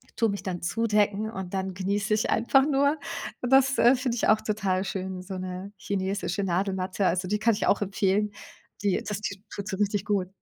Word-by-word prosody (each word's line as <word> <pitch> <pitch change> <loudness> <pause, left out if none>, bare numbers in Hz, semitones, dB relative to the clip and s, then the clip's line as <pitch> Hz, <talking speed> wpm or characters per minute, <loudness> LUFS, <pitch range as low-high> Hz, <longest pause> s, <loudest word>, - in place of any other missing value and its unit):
tue 225 - +2
mich 200 -1 -4
dann 185 -3 -4
zudecken 210 +2 +1
und 190 -4 -6
dann 190 0 -2
genieße 200 +3 -1
ich 215 - +1
einfach 265 +4 +4
nur. 285 +2 +3 0.4
Und 245 - -2
das, 270 0 +5
äh, 245 +3 +6
finde 250 -2 -1
ich - - +1
auch 215 - +4
total 200 -4 0
schön, 190 -1 -4
so 190 +1 -6
'ne 185 +2 -6
chinesische 195 0 -2
Nadelmatte. 190 +1 0
Also, 180 +2 0
die 210 +3 0
kann 225 0 +3
ich 205 - -1
auch 200 - +3
empfehlen, 200 +1 +1 0.5
die 200 -2 +2
das 205 0 -3
die 200 -2 -4
tut 200 0 -6
so 195 -2 -3
richtig 205 0 0
gut. 200 -3 0
200 Hz, 200 wpm, -27 LUFS, 190-215 Hz, 0.5 s, äh